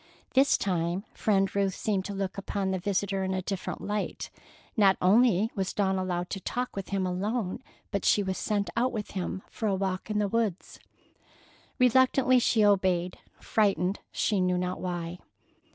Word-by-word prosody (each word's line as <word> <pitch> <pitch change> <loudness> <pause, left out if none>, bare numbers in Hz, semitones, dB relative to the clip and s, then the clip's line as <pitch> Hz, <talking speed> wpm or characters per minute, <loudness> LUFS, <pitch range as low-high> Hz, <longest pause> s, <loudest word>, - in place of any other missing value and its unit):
This 275 +1 +5
time 175 0 -1
Friend 195 -2 +1
Ruth 195 -2 +1
seemed 195 -3 -1
to 205 - -4
look 195 -1 -3
upon 195 -1 -2
the 190 - -1
visitor 195 +1 -1
in 190 0 -1
a 185 - -2
different 195 0 -4
light. 210 0 -3 0.4
Not 200 -4 +5
only 215 +1 +4
was 190 -2 -2
Dawn 190 -2 +1
allowed 180 -1 -2
to 195 - -3
talk 245 +6 -3
with 195 -1 -5
him 195 -2 0
alone, 190 +2 -2 0.3
but 200 -2 -1
she 205 - +4
was 190 -1 -3
sent 205 -1 -1
out 250 +2 +2
with 215 -3 -5
him 190 0 -4
for 220 - -4
a 195 - +2
walk 190 +1 -2
in 210 - -1
the 210 -1 +2
woods. 215 -3 -2 1.0
Reluctantly 255 0 +4
she 225 -3 +3
obeyed, 185 -3 +2 0.2
frightened, 195 -3 +1
she 205 -3 +1
knew 180 0 +2
not 180 0 -2
why. 175 -1 -4
195 Hz, 170 wpm, -28 LUFS, 185-210 Hz, 1.0 s, This